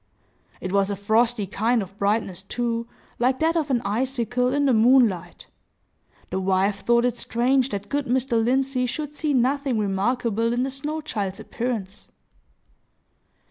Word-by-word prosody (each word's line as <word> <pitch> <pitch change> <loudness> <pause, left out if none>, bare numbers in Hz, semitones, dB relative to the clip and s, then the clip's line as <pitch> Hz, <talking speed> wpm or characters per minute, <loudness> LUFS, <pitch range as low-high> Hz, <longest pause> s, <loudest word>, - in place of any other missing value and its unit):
It 185 - -5
was 195 0 +2
a 200 - -1
frosty 220 +2 +1
kind 220 +4 0
of 195 +1 -12
brightness, 200 -3 0
too, 230 +3 -3 0.3
like 255 +2 +2
that 325 +3 +1
of 310 -3 0
an 245 -3 +1
icicle 250 +2 0
in 285 +1 +1
the 265 - +4
moonlight. 220 -7 +3 0.9
The - - -1
wife 190 +1 +1
thought 235 0 +3
it 245 - 0
strange 255 +3 +1
that 200 -2 -5
good 285 +2 -2
Mr. 245 -2 +1
Lindsey 260 +1 +1
should 295 +3 -4
see 300 0 -2
nothing 270 0 +1
remarkable 225 +3 0
in 245 +1 0
the 265 - -2
snow 300 +4 -4
child's 205 -10 -4
appearance. 225 -5 -4
240 Hz, 150 wpm, -24 LUFS, 205-260 Hz, 0.9 s, the